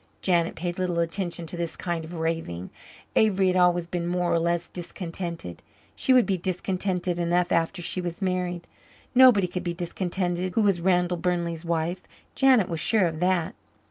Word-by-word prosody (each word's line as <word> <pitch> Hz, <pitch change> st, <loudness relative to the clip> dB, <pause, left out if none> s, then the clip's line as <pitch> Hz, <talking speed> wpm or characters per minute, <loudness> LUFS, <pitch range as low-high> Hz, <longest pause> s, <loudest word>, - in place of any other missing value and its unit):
Janet 170 Hz, -3 st, +2 dB
paid 175 Hz, +2 st, -4 dB
little 180 Hz, -2 st, -1 dB
attention 170 Hz, 0 st, -1 dB
to 165 Hz, -, -6 dB
this 170 Hz, -1 st, -3 dB
kind 170 Hz, -2 st, -3 dB
of 165 Hz, +2 st, -8 dB
raving. 160 Hz, -, -3 dB, 0.4 s
Avery 195 Hz, -3 st, +3 dB
had 180 Hz, -, 0 dB
always 175 Hz, -1 st, +3 dB
been 170 Hz, 0 st, -3 dB
more 175 Hz, 0 st, 0 dB
or 170 Hz, -, +3 dB
less 170 Hz, +1 st, 0 dB
discontented. 170 Hz, -, -6 dB, 0.3 s
She -, -, +1 dB
would 255 Hz, -2 st, +6 dB
be 190 Hz, -3 st, 0 dB
contented 180 Hz, 0 st, -1 dB
enough 175 Hz, +1 st, +1 dB
after 170 Hz, +2 st, 0 dB
she 185 Hz, -, -1 dB
was 175 Hz, -1 st, -5 dB
married. 180 Hz, -2 st, -2 dB, 0.5 s
Nobody 250 Hz, -7 st, +7 dB
could 180 Hz, 0 st, -4 dB
be 175 Hz, -1 st, -3 dB
discontented 175 Hz, +1 st, -2 dB
who 225 Hz, -, +3 dB
was 195 Hz, -4 st, +2 dB
Randall 180 Hz, -1 st, +2 dB
Burnley's 170 Hz, -1 st, -2 dB
wife. 170 Hz, +2 st, -2 dB, 0.3 s
Janet 260 Hz, -8 st, +4 dB
was 165 Hz, -3 st, -3 dB
sure 215 Hz, 0 st, +2 dB
of 160 Hz, -2 st, -2 dB
that. 180 Hz, -2 st, +1 dB
175 Hz, 175 wpm, -26 LUFS, 170-185 Hz, 0.5 s, Nobody